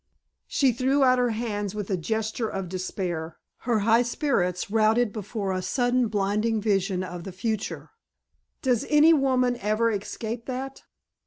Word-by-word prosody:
She 275 -5 +3
threw 265 +4 +2
out 255 -1 +4
her 245 -1 +2
hands 210 -3 -3
with 205 -2 -4
a - - +2
gesture 220 +5 -2
of 195 -1 -4
despair, 180 -3 -4 0.3
her 225 -3 +3
high 230 +1 +5
spirits 200 - -1
routed 220 +1 +3
before 205 -2 -3
a 185 - -2
sudden 245 +5 +1
blinding 210 +2 0
vision 195 -3 0
of 180 -1 -7
the 190 - -7
future. 215 - -4 0.7
"Does 250 -4 +2
any 305 +2 +6
woman 255 -4 +2
ever 215 +2 +1
escape 225 +3 -5
that?" 265 +1 -5
220 Hz, 150 wpm, -26 LUFS, 195-245 Hz, 0.7 s, any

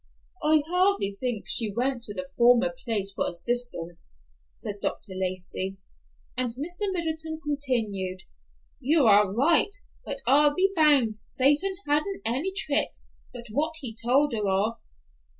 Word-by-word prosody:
"I 305 0 +3
hardly 360 - +1
think 245 -5 -3
she 220 -3 0
went 245 +3 -1
to 205 - -7
the 185 -1 -6
former 245 +2 +4
place 205 -4 +1
for - - -1
assistance," 175 - -3 0.4
said 205 0 -7
Dr. 195 - -4
Lacey; 185 +1 -3 0.6
and 250 0 0
Mr. 350 - -3
Middleton 320 -3 -3
continued, 230 -11 -2 0.6
"You 295 +1 +3
are 205 -2 +5
right, 325 - +3 0.3
but 275 -1 -4
I'll 290 +3 +4
be 385 +1 +2
bound 285 -9 +4
Satan 290 - +1
hadn't 305 +7 0
any 265 +12 +2
tricks 310 -7 0 0.2
but 240 -1 -10
what 310 +7 -1
he 245 -7 -4
told 260 +5 +2
her 210 -3 -1
of. 200 +4 0
250 Hz, 135 wpm, -26 LUFS, 205-305 Hz, 0.6 s, are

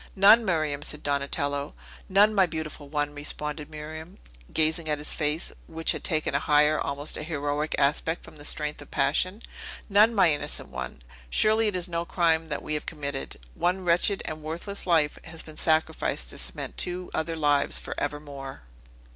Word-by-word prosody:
"None, 210 +4 +7
Miriam!" 155 -7 0
said 150 0 -3
Donatello. 145 0 -1 0.3
"None, 205 +3 +5
my 195 -3 +4
beautiful 155 -3 -5
one!" 145 0 -1
responded 150 +1 -4
Miriam, 155 +4 -8 0.3
gazing 160 +1 +1
in 150 -1 +1
his 150 - -2
face, 150 +2 -1
which 165 0 0
had - - -4
taken 155 -4 0
a 140 - +3
higher, 150 0 +3
almost 140 +2 -1
an 150 - -5
heroic 150 -1 -1
aspect, 150 +4 +1
from - - -12
the 145 - -11
strength 150 0 -2
of 145 - -12
passion. 185 +5 +1 0.5
"None, 210 +3 +5
my 180 -6 +5
innocent 145 - -2
one! 65 -2 -7 0.3
Surely, 215 - +4
it 205 - 0
is 180 0 +1
no 170 -1 -2
crime 165 -2 +2
that - - -4
we 155 - -3
have 150 - -3
committed. 140 -3 -4 0.2
One 180 - 0
wretched 175 +3 +2
and 155 0 -5
worthless 170 +6 -5
life 160 -4 +3
has 160 -1 -4
been 155 -1 -11
sacrificed 160 0 +1
to - - -8
cement 60 0 -5
two 180 0 -1
other 165 +1 -1
lives 145 -2 +3
for - - -3
evermore." 145 - -5
155 Hz, 175 wpm, -27 LUFS, 145-175 Hz, 0.5 s, None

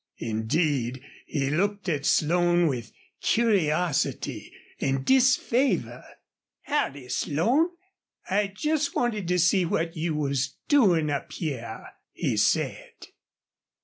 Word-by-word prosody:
Indeed, 125 +3 -1 0.2
he 140 -2 -1
looked 200 +5 -1
at 145 -5 -1
Slone 175 +2 +3
with 120 -7 -2 0.3
curiosity 180 - 0 0.3
and 135 -1 -1
disfavor. 260 0 +2 0.6
"Howdy, 145 - -2
Slone! 235 - +1 0.6
I 205 +2 +1
jest 300 +9 -1
wanted 215 -7 -1
to 180 +1 +1
see 180 +2 +3
what 165 0 -1
you 160 -1 -2
was 140 -2 -1
doin' 180 - +4
up 140 - -3
hyar," 120 -9 -5 0.3
he - - -1
said. - - 0
165 Hz, 105 wpm, -26 LUFS, 140-205 Hz, 0.6 s, doin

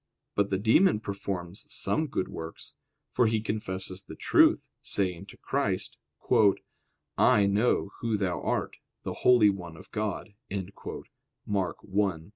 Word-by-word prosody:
But 100 -1 +1
the 95 - +1
demon 110 - +4
performs 100 -2 -5
some 155 0 +1
good 125 - -2
works: 80 0 -8 0.4
for 125 -2 +3
he 110 0 +1
confesses 95 -3 -3
the 95 - -11
truth, - - +4
saying 90 -4 -2
to - - -12
Christ: - - -2 1.2
"I 110 -6 +5
know 100 0 +2
Who 115 -2 0
Thou 95 -3 -1
art, - - -2 0.3
the - - -3
holy 120 -5 +6
one 90 -4 -8
of - - -15
God" 105 -1 -3 1.1
(Mark 100 -3 -1
1:24). 95 -4 -1
100 Hz, 130 wpm, -28 LUFS, 95-110 Hz, 1.2 s, holy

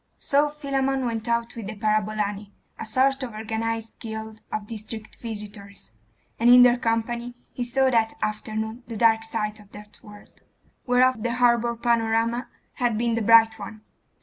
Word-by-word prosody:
So 290 +1 +2
Philammon 270 -3 -1
went 225 -1 -3
out 235 0 -1
with 225 -4 -6
the 215 - -6
parabolani, 210 -1 -1 0.3
a 225 - -6
sort 270 +4 +2
of 240 -4 -5
organised 225 +1 -4
guild 220 -1 -7
of 215 - -3
district 220 0 -6
visitors.... 205 - -8 0.5
And 235 +1 +4
in 245 0 +9
their 245 0 +5
company 235 +1 -2 0.2
he 245 - -3
saw 265 +2 +2
that 225 -2 +1
afternoon 220 +2 -3
the 230 - -6
dark 225 0 +4
side 215 -1 -3
of 205 -1 -18
that 210 0 -13
world, 210 -1 -16 0.5
whereof 250 -1 +3
the 235 +1 -1
harbour 235 -1 +3
panorama 230 +1 0 0.3
had 240 -3 +1
been 235 +1 0
the 230 - 0
bright 225 0 +5
one. 210 +1 -8
225 Hz, 160 wpm, -24 LUFS, 215-240 Hz, 0.5 s, in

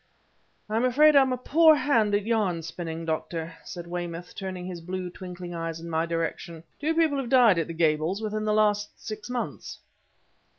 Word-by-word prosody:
"I'm 220 +3 0
afraid 295 +5 +5
I'm 265 -2 +5
a 255 - 0
poor 315 +5 +5
hand 235 -7 +2
at 205 0 -1
yarn 205 -7 0
spinning, 165 0 -6
Doctor," 165 +1 -3
said 175 -1 -8
Weymouth, 175 0 -5
turning 185 -2 -6
his 180 -2 -6
blue, 180 +1 -5
twinkling 180 -1 -8
eyes 165 -1 -4
in 165 0 -8
my 160 +1 0
direction. 165 0 -4 0.2
"Two 315 +3 0
people 315 -4 +2
have 255 -3 -4
died 240 -9 +5
at 165 - -1
the 165 - -5
Gables 160 +3 +1
within 215 -1 -3
the 215 - +1
last 210 -1 +2
six 215 +1 -7
months." 245 -1 -4
185 Hz, 180 wpm, -26 LUFS, 170-235 Hz, 0.2 s, afraid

